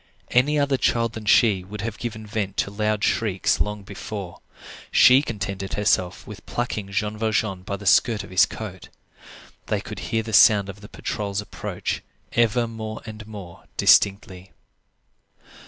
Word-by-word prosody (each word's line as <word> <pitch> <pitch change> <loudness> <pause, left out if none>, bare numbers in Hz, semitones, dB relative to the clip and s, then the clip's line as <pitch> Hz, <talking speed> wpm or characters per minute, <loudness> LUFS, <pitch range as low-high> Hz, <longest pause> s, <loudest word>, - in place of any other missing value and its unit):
Any 140 +5 +3
other 140 -2 +2
child 115 -2 +1
than 110 -1 -7
she 100 -2 +4
would 100 +2 -8
have 115 0 -5
given 110 -2 -5
vent 100 -2 -3
to 100 - 0
loud 105 0 -1
shrieks 100 -4 +1
long 105 -1 -2
before. 100 -1 -7 0.5
She 130 +2 +7
contented 100 -6 -4
herself 100 -3 0
with 105 -2 -10
plucking 110 -4 -3
Jean 105 +2 -2
Valjean 110 -4 0
by 100 +2 -4
the 100 +1 -10
skirt 105 +1 +4
of 100 - -12
his 95 +2 +5
coat. 95 -5 -8 0.8
They - - 0
could - - -8
hear 115 -1 0
the 110 0 -7
sound 105 -2 +6
of 100 +1 -9
the 105 - -11
patrol's 100 -1 -3
approach 105 - -4 0.3
ever 120 0 +2
more 110 -1 -7
and 110 -1 -9
more 100 -5 -10
distinctly. 95 -2 +3
105 Hz, 155 wpm, -23 LUFS, 100-110 Hz, 0.8 s, She